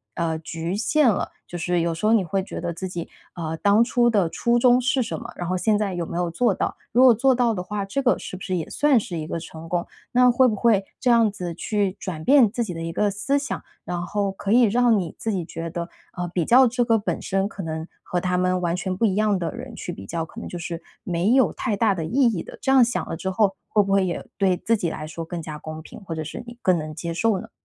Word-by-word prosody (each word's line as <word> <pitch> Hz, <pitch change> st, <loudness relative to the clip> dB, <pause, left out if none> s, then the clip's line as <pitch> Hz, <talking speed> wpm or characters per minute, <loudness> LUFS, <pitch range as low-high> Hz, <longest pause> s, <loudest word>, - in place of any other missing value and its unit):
呃， 165 Hz, -2 st, -1 dB
局 165 Hz, +2 st, -4 dB
限 280 Hz, +4 st, +3 dB
了， 205 Hz, -, -1 dB, 0.2 s
就 175 Hz, -, -6 dB
是 175 Hz, +1 st, 0 dB
有 170 Hz, 0 st, 0 dB
时 165 Hz, +6 st, -4 dB
候 220 Hz, -, +5 dB
你 215 Hz, -4 st, +4 dB
会 195 Hz, +3 st, -1 dB
觉 -, -, -6 dB
得 170 Hz, -1 st, -3 dB
自 185 Hz, +3 st, -5 dB
己， 175 Hz, -2 st, -5 dB, 0.3 s
呃， 160 Hz, -1 st, -4 dB
当 205 Hz, +5 st, +4 dB
初 240 Hz, 0 st, +2 dB
的 200 Hz, -7 st, +2 dB
初 235 Hz, +7 st, +1 dB
衷 245 Hz, 0 st, +5 dB
是 265 Hz, +1 st, +1 dB
什 225 Hz, -, -4 dB
么， 235 Hz, +1 st, -8 dB
然 175 Hz, -, -4 dB
后 185 Hz, 0 st, 0 dB
现 215 Hz, +3 st, +2 dB
在 205 Hz, -2 st, -1 dB
有 175 Hz, -1 st, -2 dB
没 -, -, -7 dB
有 175 Hz, -1 st, 0 dB
做 230 Hz, +5 st, +2 dB
到， -, -, -2 dB, 0.2 s
如 250 Hz, +3 st, +6 dB
果 255 Hz, -2 st, +8 dB
做 260 Hz, +4 st, +3 dB
到 240 Hz, -2 st, +2 dB
的 180 Hz, -, -3 dB
话， 205 Hz, +2 st, -3 dB
这 240 Hz, +8 st, -2 dB
个 255 Hz, -2 st, +3 dB
是 -, -, -7 dB
不 -, -, -16 dB
是 185 Hz, 0 st, -2 dB
也 165 Hz, -3 st, -3 dB
算 290 Hz, -4 st, +3 dB
是 180 Hz, -4 st, -5 dB
一 155 Hz, -1 st, -4 dB
个 165 Hz, -, -3 dB
成 160 Hz, 0 st, -10 dB
功？ 175 Hz, 0 st, 0 dB, 0.3 s
那 250 Hz, 0 st, +6 dB
会 255 Hz, +1 st, +5 dB
不 220 Hz, -, 0 dB
会 205 Hz, -3 st, +3 dB, 0.2 s
这 250 Hz, -, +2 dB
样 230 Hz, -2 st, +5 dB
子 180 Hz, -4 st, -5 dB
去 200 Hz, +2 st, -1 dB
转 160 Hz, -5 st, -5 dB
变 265 Hz, -5 st, +6 dB
自 235 Hz, +1 st, -1 dB
己 185 Hz, -6 st, -5 dB
的 165 Hz, -, -6 dB
一 165 Hz, 0 st, -3 dB
个 210 Hz, +3 st, +2 dB
思 270 Hz, +8 st, 0 dB
想， 275 Hz, -3 st, -4 dB, 0.2 s
然 175 Hz, -1 st, -3 dB
后 195 Hz, +3 st, -1 dB
可 195 Hz, +1 st, -4 dB
以 245 Hz, -, +6 dB
让 235 Hz, 0 st, +4 dB
你 170 Hz, -4 st, -4 dB
自 225 Hz, -, -2 dB
己 180 Hz, -, -1 dB
觉 165 Hz, 0 st, -6 dB
得， 170 Hz, +1 st, -5 dB, 0.2 s
呃， 175 Hz, 0 st, -3 dB
比 175 Hz, -3 st, 0 dB
较 260 Hz, +2 st, +7 dB
这 245 Hz, +1 st, +1 dB
个 225 Hz, -2 st, +4 dB
本 205 Hz, -, -3 dB
身 195 Hz, 0 st, 0 dB
可 195 Hz, -, -7 dB
能 160 Hz, 0 st, -4 dB, 0.2 s
和 180 Hz, -, -1 dB
他 180 Hz, -1 st, 0 dB
们 185 Hz, 0 st, +1 dB
完 170 Hz, -1 st, 0 dB
全 185 Hz, +1 st, -3 dB
不 225 Hz, -, +1 dB
一 195 Hz, -4 st, +1 dB
样 210 Hz, -1 st, +2 dB
的 165 Hz, -3 st, -2 dB
人 -, -, -8 dB
去 -, -, -5 dB
比 95 Hz, -, -9 dB
较， 165 Hz, +10 st, -3 dB
可 -, -, -11 dB
能 -, -, -6 dB
就 175 Hz, -, -6 dB
是 170 Hz, 0 st, -5 dB, 0.2 s
没 180 Hz, 0 st, 0 dB
有 260 Hz, -1 st, +4 dB
太 215 Hz, -, -1 dB
大 215 Hz, -1 st, +3 dB
的 165 Hz, -, -3 dB
意 160 Hz, -, -6 dB
义 205 Hz, -8 st, 0 dB
的， -, -, -11 dB
这 265 Hz, -, +1 dB
样 265 Hz, -2 st, +7 dB
想 240 Hz, -, -2 dB
了 -, -, -3 dB
之 190 Hz, -, -3 dB
后， 195 Hz, 0 st, +2 dB
会 210 Hz, -1 st, +4 dB
不 195 Hz, -, -3 dB
会 195 Hz, -1 st, +4 dB
也 175 Hz, -, -3 dB
对 190 Hz, -2 st, +3 dB
自 230 Hz, -, +1 dB
己 175 Hz, -4 st, -1 dB
来 155 Hz, -, -5 dB
说 165 Hz, +1 st, -6 dB
更 170 Hz, +1 st, -5 dB
加 155 Hz, -1 st, -7 dB
公 155 Hz, +1 st, -7 dB
平， 160 Hz, -, -12 dB
或 175 Hz, -, -5 dB
者 155 Hz, -, -3 dB
是 165 Hz, -, -7 dB
你 235 Hz, 0 st, -11 dB
更 185 Hz, -2 st, +3 dB
能 155 Hz, -1 st, -5 dB
接 170 Hz, +2 st, -4 dB
受 210 Hz, +3 st, +1 dB
呢？ -, -, -10 dB
190 Hz, 305 characters per minute, -23 LUFS, 170-230 Hz, 0.3 s, 果